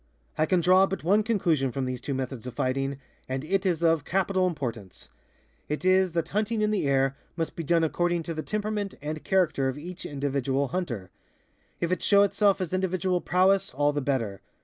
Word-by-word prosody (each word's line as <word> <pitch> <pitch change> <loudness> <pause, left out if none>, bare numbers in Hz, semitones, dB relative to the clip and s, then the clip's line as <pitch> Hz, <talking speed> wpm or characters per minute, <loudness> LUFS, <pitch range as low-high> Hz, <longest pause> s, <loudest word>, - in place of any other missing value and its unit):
I 155 - +1
can 180 +1 +2
draw 185 +3 +5
but 195 - -4
one 200 +6 +4
conclusion 170 - +1
from 135 +1 -2
these 125 -1 -4
two 140 - -3
methods 130 -2 -4
of 125 - -7
fighting, 135 +1 -1 0.3
and 130 +2 -3
it 195 +3 0
is 170 -2 0
of 165 -3 +3
capital 190 +2 +1
importance. 120 - -5 0.6
It 150 +4 -3
is 185 -1 +4
that 170 -1 -1
hunting 215 +2 0
in 210 - +2
the 200 -9 0
air 135 0 +2 0.2
must 165 -2 -3
be - - -4
done 165 +1 +2
according 175 +1 0
to 165 - -4
the 155 - -3
temperament 210 +1 -3
and 155 +1 -5
character 160 -8 +2
of 130 +1 -2
each 175 +4 -8
individual 140 -1 -1
hunter. 130 - -4 0.7
If 170 - -1
it 185 - 0
show 200 -1 +5
itself 200 0 +2
as 185 -2 -3
individual 185 -1 0
prowess, 190 -1 +2
all 145 +1 +2
the 145 - -1
better. 115 -8 -2
165 Hz, 195 wpm, -27 LUFS, 135-190 Hz, 0.7 s, draw